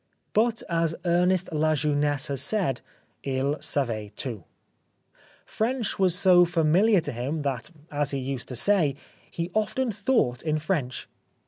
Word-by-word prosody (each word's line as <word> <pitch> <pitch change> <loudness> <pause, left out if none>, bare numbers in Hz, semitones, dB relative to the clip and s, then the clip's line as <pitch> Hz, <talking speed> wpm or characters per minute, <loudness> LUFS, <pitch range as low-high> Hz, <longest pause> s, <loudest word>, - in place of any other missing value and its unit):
But 225 +1 +2
as 165 -2 0
Ernest 180 +1 +2
La 155 0 +2
Jeunesse 145 -1 +1
has 140 -2 -1
said: 185 - 0 0.4
"II 135 +2 -1
savait 120 -8 -1
tout." 115 -9 -5 1.0
French 235 -1 -2
was 185 -2 +3
so 180 -2 +6
familiar 175 +4 +3
to - - -3
him 135 +6 -3
that, 135 -3 -3 0.2
as 145 -1 0
he 140 - -1
used 135 -1 -4
to 125 - -6
say, 160 - +3 0.2
" - - -30
he 170 +1 -4
often 220 +4 0
thought 195 - 0
in 155 -1 0
French." 150 -5 -2
155 Hz, 145 wpm, -26 LUFS, 135-185 Hz, 1.0 s, so